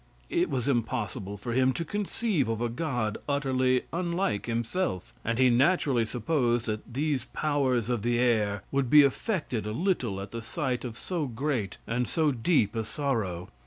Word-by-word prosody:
It 350 +1 +2
was 125 0 -1
impossible 115 -5 -1
for 120 +4 -4
him 130 +1 +3
to 165 - -3
conceive 205 - -1
of 115 -1 -1
a 120 0 0
god 120 -5 -2
utterly 130 -3 +2
unlike 170 - -1
himself, 115 - -2
and 115 0 -1
he 130 -1 +5
naturally 135 -2 +3
supposed 120 0 0
that 110 +2 -4
these 140 -3 0
powers 130 -5 0
of 120 -3 0
the 120 +2 +1
air 105 -5 +2
would 135 -3 +1
be 150 +2 +9
affected 140 - -1
a 105 - -2
little 125 - 0
at 100 0 -7
the 115 - -5
sight 125 +2 -2
of 120 -2 -6
so 165 +2 -2
great 125 -3 -2
and 125 +1 -1
so 155 -2 +2
deep 120 - +2
a 115 - 0
sorrow. 105 - -2
125 Hz, 170 wpm, -28 LUFS, 115-145 Hz, -, be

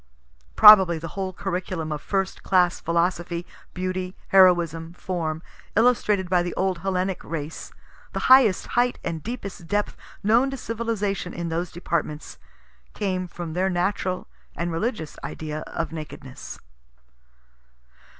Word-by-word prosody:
(Probably 190 - +9
the 165 +1 -6
whole 190 +3 -4
curriculum 180 -3 -3
of 150 -1 -3
first 195 -1 -2
class 180 -2 +2
philosophy, 170 0 -1 0.3
beauty, 185 0 -3
heroism, 170 -3 +4
form, 165 -3 -3 0.3
illustrated 215 -5 +3
by 180 0 +3
the 175 0 -4
old 185 -2 0
Hellenic 185 +1 -1
race 160 -1 -6 0.4
the - - -2
highest 255 -7 +6
height 245 +1 +2
and 165 -2 -3
deepest 200 -6 -7
depth 205 +3 -1 0.3
known 230 +6 +4
to 270 - -5
civilization 215 -6 -3
in 170 -1 -3
those 170 +2 -2
departments 155 -3 -3 0.6
came 185 -3 -2
from 170 -2 -7
their 185 +3 +1
natural 185 0 -1 0.3
and 170 0 -2
religious 165 - -3
idea 155 -1 -5
of 165 - -3
Nakedness.) 150 -5 -8
180 Hz, 125 wpm, -24 LUFS, 170-195 Hz, 0.6 s, Probably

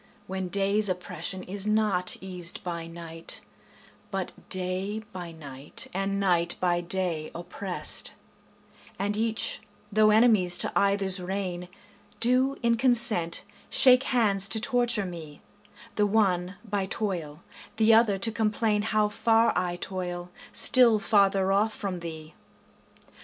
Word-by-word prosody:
When 190 0 -4
day's 200 +2 +1
oppression 185 +1 -4
is 195 +2 -3
not 210 -4 +2
eas'd 180 -2 -6
by 170 -2 -5
night, 165 -1 -4 0.7
But - - -4 0.2
day 185 +3 -2
by 175 -2 -7
night 140 -3 -6
and 195 +1 -2
night 175 -3 +2
by 175 -1 +1
day 175 -3 -1
oppress'd, 180 +2 -3 0.8
And 205 +1 -2
each, 220 0 -1 0.3
though 215 +1 +4
enemies 210 -5 +3
to - - +4
either's 200 -1 +1
reign, 180 -1 -4 0.5
Do 255 +3 +3
in 235 0 +2
consent 235 -9 +4 0.3
shake 255 0 +5
hands 200 -6 +2
to 220 - +5
torture 240 -4 +1
me, 160 -5 -9 0.6
The 210 -1 +3
one 190 -3 +1
by 200 -2 -2
toil, 170 -8 -4 0.3
the 225 0 +4
other 220 -3 +4
to 225 +4 0
complain 220 -1 0
How 215 0 +1
far 225 +2 +2
I 180 -1 -1
toil, 180 -1 -5 0.2
still 245 -4 +4
farther 195 -2 +2
off 210 +3 +1
from 190 -4 -4
thee. 160 -2 -9
195 Hz, 125 wpm, -26 LUFS, 180-215 Hz, 0.8 s, shake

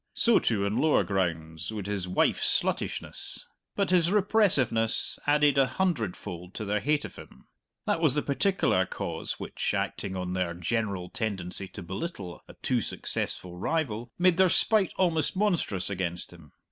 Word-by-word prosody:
So, 235 -1 +4
too, 100 -4 +1
on 100 +2 -1
lower 155 -9 +4
grounds, 85 -2 -2
would 105 -3 -5
his 100 -2 -2
wife's 90 - +3
sluttishness. - - -3 0.3
But 200 -2 0
his 175 -2 +4
repressiveness 185 - +2
added 145 -1 +4
a 135 - +5
hundredfold 105 - -3
to 110 - -4
their 105 +1 0
hate 150 +5 +1
of - - -10
him. - - -13 0.4
That - - +1
was 150 -5 +4
the 150 - +1
particular 140 - +1
cause - - -4
which, - - -2
acting 95 -2 -2
on 90 0 -3
their 90 -2 -1
general 95 0 -2
tendency 95 -3 -3
to 100 - -9
belittle 95 - -6
a - - -13
too - - +1
successful 90 -1 -3
rival, 120 - -1
made 180 -1 +4
their 190 -1 +5
spite 210 +2 +4
almost 170 -1 +2
monstrous 175 - 0
against 90 -2 -3
him. 80 -4 -16
110 Hz, 160 wpm, -28 LUFS, -, 0.4 s, a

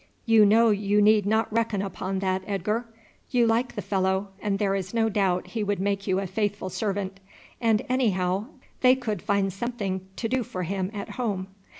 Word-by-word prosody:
You 225 -2 +6
know 225 +2 +5
you 205 0 +2
need 210 -1 +5
not 220 +1 +1
reckon 225 -3 +1
upon 190 0 -3
that, 190 -1 0
Edgar. 210 +4 -1 0.4
You 245 -2 +3
like 230 +2 +1
the - - -4
fellow, 190 0 0
and 205 -2 0
there 200 -1 +1
is 195 +2 -3
no 225 -1 +3
doubt 195 -3 0
he 225 -2 -2
would 205 -1 -1
make 200 +1 -1
you 190 -1 +2
a 195 - -2
faithful 205 0 -2
servant; 195 -2 -3 0.4
and 225 -2 +3
anyhow 200 -5 +1 0.3
they 255 0 +6
could 225 -5 -3
find 200 -2 0
something 195 -4 -3
to 225 - -2
do 260 +3 0
for 185 -5 -4
him 190 +1 -2
at 205 -2 -6
home." 200 -6 -3
205 Hz, 190 wpm, -26 LUFS, 190-225 Hz, 0.4 s, You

